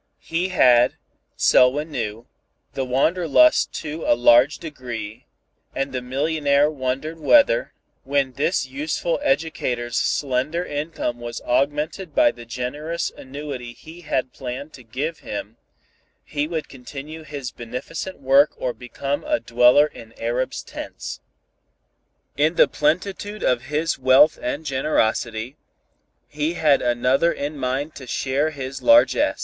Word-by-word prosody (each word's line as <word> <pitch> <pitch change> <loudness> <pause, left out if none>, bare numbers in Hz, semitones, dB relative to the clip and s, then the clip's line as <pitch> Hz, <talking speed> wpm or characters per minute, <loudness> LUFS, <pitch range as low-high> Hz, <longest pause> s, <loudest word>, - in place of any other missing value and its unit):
He 170 +3 -2
had, 125 -9 +5 0.4
Selwyn 145 +5 +4
knew, 115 -3 -4 0.5
the 135 - -2
wanderlust 165 - +3
to 155 +1 -5
a - - +3
large 120 +4 +5
degree, 120 -8 -7 0.5
and 135 0 -2
the 130 - -2
millionaire 145 +2 +1
wondered 135 +3 -3
whether, 300 - +4 0.3
when 140 -1 0
this 145 +5 0
useful 150 +5 -2
educator's 130 -5 -1
slender 145 +6 0
income 145 -5 -3
was 120 0 -6
augmented 150 +6 -1
by 120 - +5
the 120 -1 -13
generous 145 +8 -3
annuity 130 -3 -7
he 165 +7 -13
had 130 -5 -2
planned 135 +4 -6
to 125 - -12
give 140 +9 -4
him, 105 +2 -7 0.7
he 145 0 -2
would 160 -2 -4
continue 140 +5 -9
his 145 -5 -6
beneficent 125 +11 -6
work 140 +2 +4
or 125 - -2
become 135 +3 -4
a - - +1
dweller 125 +5 +5
in 115 -6 -12
arabs' 120 +3 -2
tents. - - -7 1.2
In 155 +4 +2
the - - +6
plenitude 195 +7 -1
of 125 0 +1
his 150 +3 -1
wealth 130 +4 +5
and 145 +6 -3
generosity, 125 -3 -1 0.7
he 155 +3 -2
had 150 -4 +3
another 125 +7 +2
in 145 0 -4
mind 135 +3 -2
to 130 - -10
share 135 +5 0
his 135 -3 -6
largess. 290 0 +4
140 Hz, 130 wpm, -22 LUFS, 125-155 Hz, 1.2 s, the